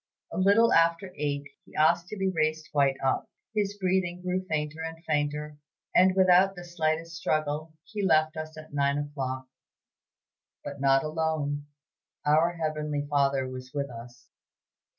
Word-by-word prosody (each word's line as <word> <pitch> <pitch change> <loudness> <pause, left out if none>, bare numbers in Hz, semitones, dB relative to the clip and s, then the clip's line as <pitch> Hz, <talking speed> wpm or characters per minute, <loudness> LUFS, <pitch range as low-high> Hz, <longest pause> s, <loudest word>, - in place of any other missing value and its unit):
A - - -4
little 205 +5 +5
after 170 +3 +3
eight 145 -1 -2 0.2
he - - -19
asked 170 +3 +3
to 215 - -7
be 190 -1 +1
raised 155 -2 -1
quite 140 -2 +3
up. 135 - 0 0.2
His 205 -1 -1
breathing 185 -2 0
grew 185 +1 -1
fainter 155 0 -2
and 165 0 -5
fainter, 150 0 -1 0.4
and 185 +1 +5
without 190 +1 +5
the 175 - -8
slightest 165 -1 -1
struggle, 155 -1 -1
he 210 0 -5
left 155 -3 +3
us 155 0 -6
at 155 -1 -11
nine 140 0 +2
o'clock, 135 -3 -3 1.2
but 140 -1 -7
not 135 -1 +4
alone; 155 -2 -1 0.6
our 160 +3 +4
Heavenly 150 -3 -2
Father 140 -2 +2
was 130 +2 -9
with 140 -2 -2
us. 120 +1 -11
155 Hz, 150 wpm, -28 LUFS, 145-175 Hz, 1.2 s, little